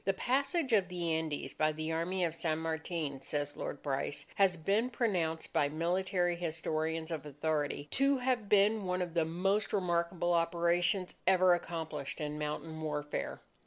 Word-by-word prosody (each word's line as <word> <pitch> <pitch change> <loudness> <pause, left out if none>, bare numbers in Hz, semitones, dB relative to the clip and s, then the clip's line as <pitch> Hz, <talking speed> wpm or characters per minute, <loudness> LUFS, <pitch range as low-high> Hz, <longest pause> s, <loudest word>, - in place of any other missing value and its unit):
"The 195 - +2
passage 275 - 0
of 200 -4 +4
the 175 -2 -1
Andes 160 -2 -2
by 155 0 +2
the 155 +1 -3
Army 175 +3 0
of 165 - -2
San 160 -1 -1
Martin," 160 -3 -3
says 145 0 -2
Lord 145 - -5
Bryce, 140 0 -2
"has 195 -3 +3
been 200 +9 +1
pronounced 180 -10 -1
by 145 - +3
military 175 +2 0
historians 160 -1 -2
of 155 -4 -3
authority 145 0 -2
to 275 +1 +3
have 250 -5 0
been 210 0 +4
one 180 0 0
of 175 -2 -6
the 165 -2 +2
most 195 +6 0
remarkable 175 -2 +1
operations 170 +2 +2
ever 185 -1 +6
accomplished 160 -5 -3
in 150 0 -3
mountain 155 +1 -4
warfare. 150 -1 -3
170 Hz, 160 wpm, -33 LUFS, 155-190 Hz, -, ever